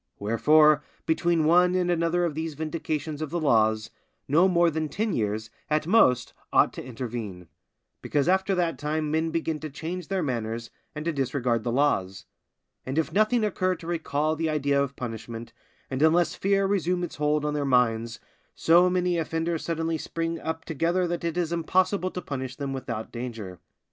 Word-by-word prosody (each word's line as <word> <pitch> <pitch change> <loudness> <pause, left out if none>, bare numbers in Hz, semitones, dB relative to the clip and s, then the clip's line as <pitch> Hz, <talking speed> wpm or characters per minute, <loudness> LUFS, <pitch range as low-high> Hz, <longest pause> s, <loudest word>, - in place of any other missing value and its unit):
Wherefore, 150 +8 +4 0.2
between 165 0 +2
one 180 +3 +5
and 180 -1 +1
another 170 +1 +1
of 165 - -2
these 160 0 -4
vindications 155 -1 -3
of 155 - -3
the 170 +3 -2
laws, 110 -6 +2 0.4
no 165 +7 +5
more 170 -2 +3
than 155 0 -2
ten 210 +8 -1
years, 110 0 -2 0.2
at 155 0 +1
most, 145 - +3 0.2
ought - - +4
to - - -7
intervene; 115 -7 -6 0.5
because 145 +1 0
after 190 +1 +2
that 175 -2 0
time 150 0 -1
men 160 +1 +1
begin 160 -1 -2
to 155 - -6
change 165 +4 -5
their 190 -2 -1
manners 115 -3 -3 0.2
and 150 +1 -5
to 170 - +1
disregard 125 -4 0
the 120 - -1
laws; 100 -8 0 0.6
and 130 +3 -4
if 160 0 0
nothing 215 +3 +3
occur 185 -3 0
to 165 - -12
recall 155 -2 -1
the 160 0 -1
idea 140 -2 +1
of 140 -1 -2
punishment, 115 -1 -6 0.3
and 130 +1 -3
unless 165 +1 +4
fear 195 +1 +1
resume 180 -2 0
its 175 - -5
hold 150 0 +1
on 150 - 0
their 145 -1 -1
minds, 115 -3 +1 0.4
so 175 +2 +5
many 180 -1 +1
offenders 165 0 -2
suddenly 165 -1 -1
spring 165 +1 -3
up 160 0 -4
together 170 +4 0
that 170 0 -3
it 170 0 -2
is 170 -1 0
impossible 185 +3 +1
to 180 -1 -6
punish 130 -2 -5
them 140 -1 -4
without 120 -4 -5
danger. 115 -7 -6
155 Hz, 180 wpm, -26 LUFS, 130-170 Hz, 0.6 s, one